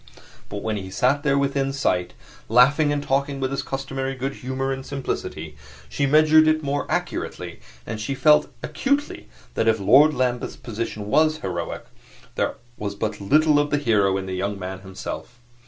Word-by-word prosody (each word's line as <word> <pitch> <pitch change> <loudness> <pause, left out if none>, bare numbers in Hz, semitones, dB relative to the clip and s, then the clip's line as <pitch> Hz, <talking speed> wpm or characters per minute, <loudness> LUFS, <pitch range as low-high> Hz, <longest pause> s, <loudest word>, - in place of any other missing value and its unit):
But 100 0 -6
when 110 -1 -1
he 95 -1 -6
sat 130 +9 +1
there 140 -2 +2
within 140 -1 0
sight, 90 -10 0 0.4
laughing 140 +6 +5
and 145 0 -1
talking 140 0 0
with 130 0 -1
his 135 0 -1
customary 135 0 -4
good 135 +2 -3
humor 130 +1 -3
and 135 0 -4
simplicity, 135 -1 -5 0.3
she 140 - 0
measured 155 +2 +6
it 155 0 +2
more 140 0 -2
accurately, - - -3 0.3
and 110 -1 -5
she 135 +6 -2
felt 150 +2 +4
acutely 280 +2 -2 0.2
that 115 - 0
if 110 -1 +3
Lord 140 +9 +6
Lambeth's 125 -1 -1
position 115 -2 -5
was 155 +5 +3
heroic, 90 -3 -4 0.5
there - - -1 0.2
was 100 -1 -4
but 105 0 -3
little 150 +8 +4
of 145 0 +1
the 145 - +1
hero 105 -8 +2
in 95 - -4
the 95 - -5
young 100 +2 -2
man 95 0 -6
himself. 95 +5 -8
135 Hz, 170 wpm, -23 LUFS, 105-145 Hz, 0.5 s, measured